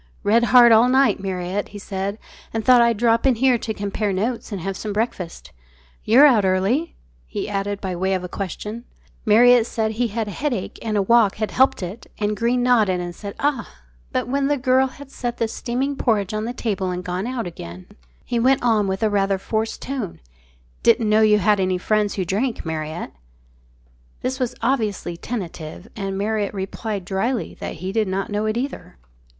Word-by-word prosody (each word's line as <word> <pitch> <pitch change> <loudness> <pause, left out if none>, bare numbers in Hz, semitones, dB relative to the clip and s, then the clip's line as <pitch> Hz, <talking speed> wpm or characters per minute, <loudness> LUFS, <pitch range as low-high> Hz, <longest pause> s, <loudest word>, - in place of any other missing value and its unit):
"Read 230 +3 +4
hard 240 -1 +7
all 225 +2 +6
night, 265 -2 +3
Marriott," 190 +1 -3
he 205 - -10
said, 200 0 -4 0.4
"and 220 -1 -2
thought 250 -1 +7
I'd 235 -2 +3
drop 230 +2 +3
in 260 - +4
here 250 0 +3
to 220 - -4
compare 205 0 -2
notes 225 +6 -2
and 200 - -3
have 195 +2 -3
some 210 +3 -5
breakfast. 200 -6 -3 0.5
You're 255 +7 +7
out 240 -8 +5
early?" 195 - +1 0.3
he - - -4
added, 200 0 -2
by 190 -3 -4
way 190 +2 0
of 185 - -3
a - - -4
question. 210 +5 -6 0.4
Marriott 240 +2 +6
said 220 -1 -1
he 235 +2 0
had 225 0 -3
a - - -4
headache 240 - -3
and 215 -2 -1
a 200 - +2
walk 220 -1 +4
had 215 0 -3
helped 265 -5 +3
it, 190 +6 -7
and 210 0 -1
Greene 240 +4 +1
nodded 215 -7 +3
and 175 0 -5
said 200 +3 -8
"Ah!" 280 -6 0 0.4
But - - -1
when 275 +2 0
the 290 0 +1
girl 260 0 +3
had 275 +1 -12
set 240 -2 -4
the 230 - 0
steaming 250 +5 -2
porridge 215 -7 0
on 215 +1 -2
the 235 - -3
table 200 -6 -2
and 180 0 -4
gone 180 +4 -3
out 250 -3 -3
again, 90 - -8 0.4
he 240 - -1
went 260 +2 +3
on 220 -4 +3
with 190 +2 -2
rather 200 -2 +2
a - - -4
forced 220 +3 -3
tone, 255 -9 -4 0.6
"Didn't 220 - +3
know 215 +1 +4
you 215 -1 +5
had 205 +1 +3
any 185 -1 +1
friends 210 +2 0
who 190 - -1
drank, 220 +6 -1
Marriott?" 160 +1 -4 1.1
This 260 +1 -2
was 250 -1 -2
obviously 220 -8 -1
tentative, 175 -3 -6
and 195 -3 -3
Marriott 210 0 -1
replied 195 0 -4
drily 215 +6 -1
that - - -5
he 185 +4 -5
did 215 0 +1
not 195 +2 -2
know 210 +1 -1
it 215 +1 -1
either. 245 - -5
215 Hz, 195 wpm, -22 LUFS, 195-240 Hz, 1.1 s, hard